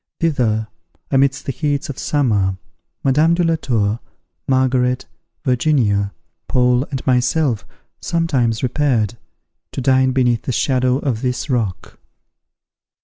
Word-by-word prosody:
Thither, 115 -9 +1 0.4
amidst 135 0 +2
the - - -1
heats 145 +1 -1
of 140 - -6
summer, 105 -10 +1 0.5
Madame 150 +5 +3
de 175 - +1
la 165 -1 +2
Tour, 115 -7 0 0.5
Margaret, 130 -1 +1 0.4
Virginia, 120 -7 +2 0.4
Paul, 125 0 +2
and 135 -4 -6
myself, 125 -1 +1 0.3
sometimes 135 -10 0
repaired, 125 -5 +1 0.6
to - - -3
dine 130 0 +3
beneath 125 -3 +2
the - - -3
shadow 130 0 +1
of 130 -6 -2
this 125 +2 -2
rock. 110 -8 -2
130 Hz, 115 wpm, -19 LUFS, 120-140 Hz, 0.6 s, Madame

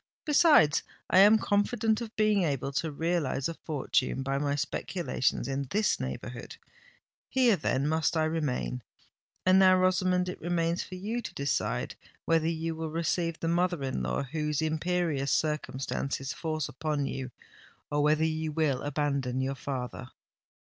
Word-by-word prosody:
Besides, 295 - +5 0.3
I 185 - +6
am 205 +3 +8
confident 215 +2 +1
of 230 -1 -7
being 215 -2 +3
able 140 -5 -1
to 155 +3 -2
realise 160 -3 -1
a 165 - -4
fortune 135 -4 -1
by 135 +1 -1
my 145 0 0
speculations 140 -3 -1
in 135 0 -2
this 210 0 +1
neighbourhood. 65 - -6 0.7
Here, 250 -5 +4
then, 145 -4 0
must 160 +1 +1
I 160 - +3
remain. 150 -5 -1 0.6
And 185 +1 +6
now, 185 -1 +6
Rosamond, 185 0 +2
it 180 - -6
remains 170 0 0
for 185 - -8
you 215 +6 -3
to 175 -5 -7
decide 140 -1 -1 0.3
whether 165 -1 +2
you 165 0 -2
will 160 0 -4
receive 165 +1 -1
the 165 - -2
mother 175 -2 +1
in 130 - -2
law 60 - -1
whom 150 +2 -3
imperious 160 -2 0
circumstances 140 -2 -2
force 155 -3 -3
upon 145 +1 -2
you—or 135 +2 -6
whether 155 +2 +3
you 160 0 -1
will 150 -4 0
abandon 140 -3 -1
your 135 +1 -1
father!" 130 -2 -5
160 Hz, 150 wpm, -29 LUFS, 140-180 Hz, 0.7 s, am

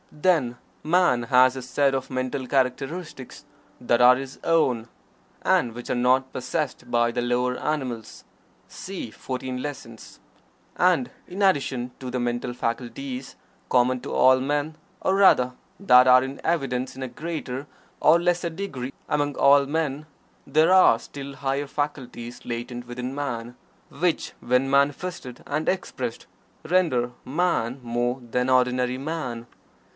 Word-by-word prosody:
Then 150 -7 +1 0.3
Man 160 -7 +3
has 125 +2 +4
a 130 - -5
set 135 +2 +1
of 135 -1 -2
mental 130 +1 -3
characteristics 135 +2 -2 0.3
that 120 - +2
are 125 +1 +8
his 135 0 -8
own, 125 -9 +1 0.5
and 120 -2 +2
which 120 +1 -9
are - - +1
not 130 +2 +2
possessed 130 0 -3
by 120 0 +2
the 120 +1 -2
lower 125 +1 0
animals 130 -7 -4 0.4
(See 185 - -7
"Fourteen 130 +1 -5
Lessons"). 115 -6 -8 0.6
And 185 +7 +2 0.2
in 190 +3 -6
addition 135 -9 +1
to 130 - -6
the 125 0 -2
mental 120 0 -2
faculties 125 +2 -4 0.3
common 125 0 +2
to 135 - -7
all 130 0 +5
men, 145 +3 -1 0.3
or 190 - +1
rather, 130 -11 +5 0.3
that 125 -10 +6
are 125 0 +7
in 135 +1 -6
evidence 135 -6 -1
in 130 - -6
a - - -3
greater 145 -2 -5 0.3
or 165 +2 +6
lesser 175 0 +1
degree 160 -8 -5 0.2
among 145 -1 0
all 140 0 +5
men, 155 -1 -2 0.4
there 160 +3 +4
are 185 -11 +7
still 140 +3 -9
higher 140 +1 -2
faculties 130 -5 -5
latent 120 +1 -5
within 125 +1 -5
Man, 120 -4 -4 0.3
which 170 +3 -1
when 125 +2 +1
manifested 140 -1 0
and 155 +2 -1
expressed 130 -10 -3 0.4
render 155 -9 +2
Man 135 -5 0
more 120 +2 -1
than 125 +1 -2
ordinary 125 0 +2
Man. 135 -5 -4
130 Hz, 140 wpm, -25 LUFS, 125-150 Hz, 0.6 s, are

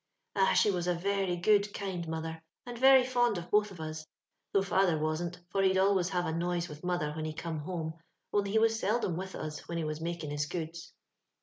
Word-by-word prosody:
'* - - -53
Ah! 195 -1 +4
she 210 - +4
was 180 -2 -2
a 180 - +2
very 195 0 0
good, 205 +3 +3
kind 185 -4 -4
mother, 160 0 -4 0.2
and 245 -1 -6
veiy 265 +1 +7
fond 240 -4 +2
of 175 0 -7
botli 210 0 +4
of 190 -4 -12
us; 155 0 -6 0.4
though 195 - +3
father 190 -3 +2
wasn't, 160 +3 -2
for 195 - +1
He'd 190 -1 +3
always 190 -2 +3
have 180 -2 0
a 160 - -1
noise 175 +1 -1
with 150 -1 -10
mother 175 -4 0
when 155 0 -4
he 155 - -3
come 160 -1 -4
home, 160 0 -4 0.4
only 200 -1 +1
he 215 - +2
was 225 0 +3
seldom 210 -4 0
with 190 +2 -5
us 155 -1 -6
when 170 - -3
he 165 - -1
was 155 0 -3
making 165 -3 -3
his 145 0 -1
goods. 165 0 -6
175 Hz, 225 wpm, -31 LUFS, 160-200 Hz, 0.4 s, veiy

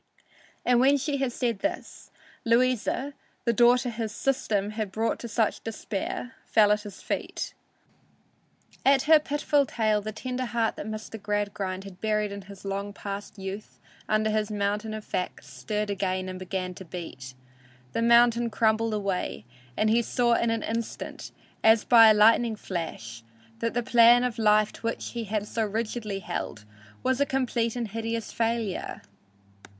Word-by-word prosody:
And 245 -1 +4
when 275 +3 +5
she 280 +1 -1
had 270 -2 0
said 235 -4 -1
this, 300 - -4 0.3
Louisa, 255 +3 +1 0.3
the 235 - +3
daughter 245 +2 +4
his 225 -1 -4
"system" 215 -5 0
had 215 -2 -3
brought 225 +3 -1
to 235 - -6
such 220 -1 0
despair, 225 +3 -4
fell 210 -2 +4
at 210 0 +2
his 205 -2 -10
feet. - - -3 1.3
At 270 0 +4
her 315 0 +7
pitiful 290 -1 +1
tale 215 -2 +1
the 215 +1 -5
tender 255 +3 -4
heart 235 -2 0
that - - -6
Mr. 220 0 -6
Gradgrind 200 -2 -2
had 195 -2 -12
buried 210 -1 0
in 200 0 -6
his 200 0 -13
long 200 +1 -3
past 200 +1 -7
youth 195 +2 -7 0.3
under 215 0 +2
his 215 0 0
mountain 210 +1 -1
of 215 - -7
facts 180 -5 -4
stirred 205 +12 -2
again 185 -1 -1
and 185 0 -6
began 185 0 -3
to 190 - -10
beat. 135 -7 -8 0.6
The 230 - 0
mountain 235 0 +5
crumbled 220 0 +1
away, 195 - -2 0.3
and 215 - +2
he 225 +2 +4
saw 240 +1 +1
in 235 0 +2
an 225 -1 -1
instant, 230 0 -5 0.3
as 220 0 +6
by 230 -2 +8
a 215 - +6
lightning 225 +2 +5
flash, 160 - -5 0.4
that 230 0 -2
the 240 - +1
plan 240 0 +6
of 245 -2 -2
life 210 -1 +4
to - - -13
which 230 0 -3
he 235 -1 -4
had 210 0 -2
so 225 - -1
rigidly 215 -1 -3
held 145 - -5 0.4
was 260 +1 +1
a - - +5
complete 245 -4 0
and 235 -3 -3
hideous 225 +1 -3
failure. 230 - -2
220 Hz, 165 wpm, -27 LUFS, 200-235 Hz, 1.3 s, by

